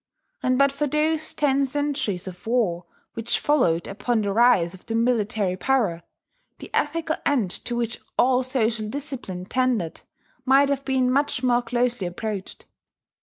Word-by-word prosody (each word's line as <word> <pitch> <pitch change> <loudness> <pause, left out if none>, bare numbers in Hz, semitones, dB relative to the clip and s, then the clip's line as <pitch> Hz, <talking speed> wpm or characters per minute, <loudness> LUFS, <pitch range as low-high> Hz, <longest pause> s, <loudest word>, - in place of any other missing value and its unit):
And 255 0 +2
but 275 0 +4
for 290 +2 -1
those 310 +2 0
ten 280 -1 +2
centuries 275 - -2
of 185 +3 -9
war 205 -8 +1 0.3
which 230 0 -1
followed 175 - +2
upon 225 +3 -1
the 200 -1 -1
rise 220 -7 +4
of 185 - -14
the 225 - -2
military 215 -5 +1
power, 200 -6 +1 0.6
the - - -11
ethical 315 +1 0
end 245 -11 +1
to 240 - -2
which 235 -1 -2 0.2
all 255 0 +4
social 230 -4 -1
discipline 260 -10 -5
tended 240 -7 0 0.4
might 275 +1 +4
have 280 -1 -1
been 260 -2 +2
much 275 -1 0
more 245 -1 +3
closely 240 -3 -1
approached. 200 +2 -5
245 Hz, 150 wpm, -24 LUFS, 210-275 Hz, 0.6 s, but